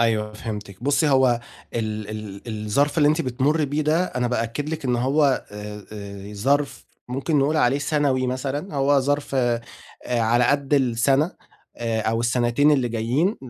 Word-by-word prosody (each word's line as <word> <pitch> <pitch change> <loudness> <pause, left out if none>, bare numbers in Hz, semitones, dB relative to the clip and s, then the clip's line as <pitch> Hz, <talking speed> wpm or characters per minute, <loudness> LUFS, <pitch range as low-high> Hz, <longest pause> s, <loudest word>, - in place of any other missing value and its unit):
أيوه 110 -2 +1
فهمتِك، 105 -2 -7
بُصي 145 +3 +2
هو 130 -3 +4 0.3
ال 110 -2 -3
ال 105 -2 -7 0.2
الظرف 140 +9 +1
اللي 145 -1 +5
أنتِ 155 +2 +2
بتمري 140 +4 +1
بيه 145 +2 -1
ده 155 +4 +2
أنا 125 -8 -2
بأكد 125 +4 -2
لِك 160 -2 -4
إن 125 -2 +1
هو 135 +2 +2
آآ 105 0 -8
آآ، 100 -1 -8
ظرف 140 +7 0 0.2
ممكن 135 +5 0
نقول 145 +3 +2
عليه 135 -1 +3
سنوي 140 -3 +1
مثلًا، 140 +6 -3
هو 140 0 +3
ظرف 145 +1 -1
آآ 120 -3 +1 0.5
على 120 0 +2
قدّ 140 +2 +2
السنة 135 +5 +2 0.4
آآ، 115 -1 -1
أو 115 +1 0
السنتين 120 +4 +2
اللي 135 -5 +2
جايين، 120 - 0
130 Hz, 160 wpm, -23 LUFS, 115-145 Hz, 0.5 s, اللي